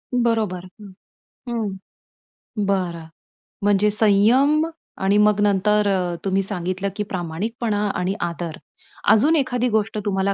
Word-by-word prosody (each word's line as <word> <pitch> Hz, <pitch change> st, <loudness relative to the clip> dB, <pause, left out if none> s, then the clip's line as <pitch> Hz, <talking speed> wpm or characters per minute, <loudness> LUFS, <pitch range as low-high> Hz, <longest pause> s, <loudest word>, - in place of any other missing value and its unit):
बरोबर, 220 Hz, -7 st, 0 dB, 0.2 s
हं, 200 Hz, -2 st, -11 dB, 0.6 s
हं, 220 Hz, -5 st, -2 dB, 0.9 s
बरं. 180 Hz, -4 st, -1 dB, 0.6 s
म्हणजे 205 Hz, 0 st, +3 dB
संयम 230 Hz, +9 st, +4 dB, 0.4 s
आणि 195 Hz, +2 st, +3 dB
मग 210 Hz, 0 st, +4 dB
नंतर 205 Hz, +1 st, +2 dB
अ, 180 Hz, -3 st, 0 dB
तुम्ही 195 Hz, 0 st, +1 dB
सांगितलं 185 Hz, 0 st, -2 dB
की 210 Hz, -, -2 dB
प्रामाणिकपणा 205 Hz, +4 st, -2 dB
आणि 180 Hz, +2 st, -1 dB
आदर. 170 Hz, -1 st, -4 dB, 0.5 s
अजून 290 Hz, +10 st, +4 dB
एखादी 250 Hz, -4 st, 0 dB
गोष्ट 220 Hz, -1 st, 0 dB
तुम्हाला 195 Hz, -1 st, +1 dB
205 Hz, 115 wpm, -22 LUFS, 190-220 Hz, 0.9 s, संयम